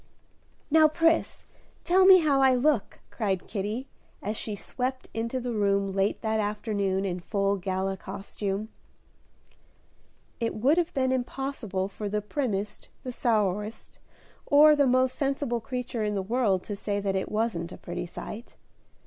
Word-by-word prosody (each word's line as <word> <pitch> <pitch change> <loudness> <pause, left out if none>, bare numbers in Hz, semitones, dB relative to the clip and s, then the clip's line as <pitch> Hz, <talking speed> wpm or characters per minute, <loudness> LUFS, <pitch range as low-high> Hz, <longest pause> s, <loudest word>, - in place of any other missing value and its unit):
"Now, 315 0 +7
Pris, 330 +1 +1 0.4
tell 370 +2 +4
me 375 -2 +9
how 285 -3 +3
I 265 -1 +5
look," 255 -4 +1
cried 195 -5 -2
Kitty, 215 +5 -3 0.3
as 210 +2 -3
she 215 -1 -4
swept 255 +5 -4
into 230 +3 -2
the 245 -1 -3
room 200 -2 +1
late 195 +1 0
that 220 0 0
afternoon 205 -2 -1
in 180 -2 -2
full 200 +2 0
gala 190 +1 -2
costume. 200 +2 -4 1.7
It 230 -2 -1
would 275 +10 +3
have 345 0 0
been 260 -1 +2
impossible 250 -6 -2
for 205 +1 -5
the 210 +1 0
primmest, 210 -2 -3 0.2
the 255 - -4
sourest, 210 -3 -1 0.5
or 300 +1 +7
the 285 -2 +3
most 255 0 +3
sensible 275 -4 -1
creature 250 -1 -3
in 210 -1 -1
the 195 - -1
world 205 -3 +1
to 205 - -5
say 205 0 -2
that 195 -1 -1
it 190 - -2
wasn't 210 -6 -1
a - - -8
pretty 175 0 -5
sight. 215 +6 -8
220 Hz, 150 wpm, -27 LUFS, 200-260 Hz, 1.7 s, me